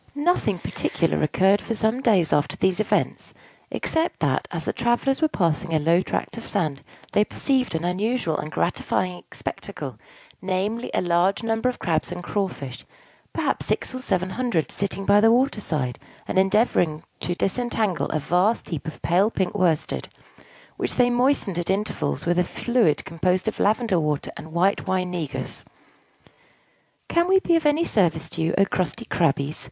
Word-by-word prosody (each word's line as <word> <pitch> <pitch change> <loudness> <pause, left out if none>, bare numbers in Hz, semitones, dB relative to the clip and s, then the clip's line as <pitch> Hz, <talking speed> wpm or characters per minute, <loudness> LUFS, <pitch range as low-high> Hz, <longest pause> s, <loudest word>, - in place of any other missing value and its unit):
Nothing 290 - +1
particular 165 0 -1
occurred 190 +6 +3
for 230 - -3
some 220 +4 0
days 195 - +3
after 145 -1 +1
these 190 0 +1
events, 215 - -1 0.3
except 325 +1 -1
that, 140 -4 0
as 170 -2 -4
the - - -1
travellers 240 +4 +1
were 315 - +5
passing 170 - 0
a - - +3
low 165 +4 +3
tract 230 - -3
of 230 - -9
sand, 155 -9 -1 0.3
they 210 - +4
perceived 255 - 0
an 160 +1 -1
unusual 190 -1 0
and 155 - -4
gratifying 180 +1 -1
spectacle; - - -6 0.4
namely, 195 +5 -1
a - - +2
large 180 +5 +2
number 225 +2 +1
of 250 - -4
Crabs 165 -1 -1
and 175 0 -5
Crawfish 175 -11 -3 0.5
perhaps - - -1
six - - -1
or 255 - -4
seven 185 -7 -1
hundred 235 -9 -1
sitting 195 0 -2
by 200 +1 +6
the 225 +2 +6
water 245 -1 +2
side, 130 -9 -2 0.3
and - - +1
endeavoring 190 -6 +2 0.2
to 175 - -2
disentangle 215 -3 0
a - - 0
vast 180 +9 +1
heap 160 -2 -4
of 160 - -8
pale 185 +5 +3
pink 190 -5 -1
worsted, 175 -6 0 0.7
which - - -2
they 245 -1 +4
moistened 240 -7 +1
at 175 - -3
intervals 190 - -1
with 175 +1 +2
a - - +4
fluid 225 - +1
composed 180 +4 0
of 220 - -2
lavender 215 -3 +2
water 150 -2 -1
and 160 +2 -9
white 185 +4 +1
wine 185 -1 0
negus. 165 -6 -4 1.4
"Can 340 +1 +2
we 380 +1 +5
be 345 -2 +2
of 320 -2 +2
any 305 +3 +3
service 165 - +1
to 165 - -3
you, 160 +1 +1
O 195 - +5
crusty 190 +5 -2
Crabbies?" 145 -5 0
190 Hz, 170 wpm, -24 LUFS, 165-230 Hz, 1.4 s, by